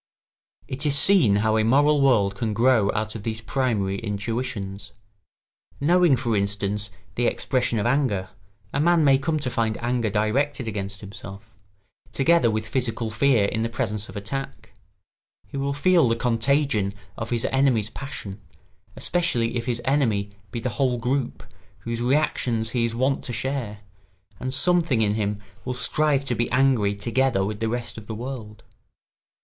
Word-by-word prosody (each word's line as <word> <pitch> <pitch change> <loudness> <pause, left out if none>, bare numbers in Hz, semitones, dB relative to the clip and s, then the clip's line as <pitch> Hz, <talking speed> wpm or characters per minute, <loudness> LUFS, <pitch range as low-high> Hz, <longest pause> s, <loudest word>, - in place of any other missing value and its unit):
] - - -38
It 135 +3 -3
is 140 -1 +4
see 185 - +6
how 110 +2 +2
a 110 - +2
moral 145 +5 +4
world 110 -8 +3
can 105 +2 -3
grow 115 -3 +3
out 110 0 -2
of 110 - -7
these 110 +1 -4
primary 110 -5 -1
intuitions. 105 -1 -4 0.9
Knowing, 170 0 +4
for 120 -3 -1
instance, 100 0 -1 0.2
the 120 +2 +1
expression 125 -3 0
of 105 - -1
anger, 120 -8 0 0.4
a 140 - 0
man 170 +1 +4
may 135 -2 +5
come 155 +3 -1
to 125 - -1
find 110 -2 0
anger 120 -2 0
directed 120 +6 0
against 100 -2 -4
himself; 100 +1 -10 0.6
together 165 -2 +3
with 110 0 -2
physical 115 -2 -1
fear 120 -3 +3
in 110 +2 -1
the 115 - -1
presence 110 -3 -3
of - - -11
attack, 135 +7 -6 0.7
he 105 - -12
will 140 +1 -1
feel 165 +1 +3
the 115 - +2
contagion 115 -3 +1 0.2
of 110 - -5
his 120 -2 0
enemy's 125 -6 +2
passion, 105 -8 -7 0.5
especially 125 -10 0
if 115 -1 -3
his 120 -1 -1
enemy 115 -8 +1 0.2
be 115 - -4
the 125 - -2
whole 130 -3 +2
group 125 +2 -2 0.4
whose 115 0 -4
reactions 120 -4 0
he 120 -2 +1
is 115 -1 -3
wont 130 +3 0
to 120 - -5
share, 115 -5 -3 0.6
and 130 - -3
something 165 -6 +2
in 105 -1 +1
him 105 -1 -1 0.2
will 125 0 -3
strive 140 +3 +1
to 125 - 0
be 120 0 -1
angry 125 -6 +2
together 115 -1 +1
with 105 +1 -4
the 115 -1 -1
rest 120 -1 -4
of 105 - -15
the 110 - -5
world. 115 -3 -7
115 Hz, 165 wpm, -24 LUFS, 105-135 Hz, 0.9 s, see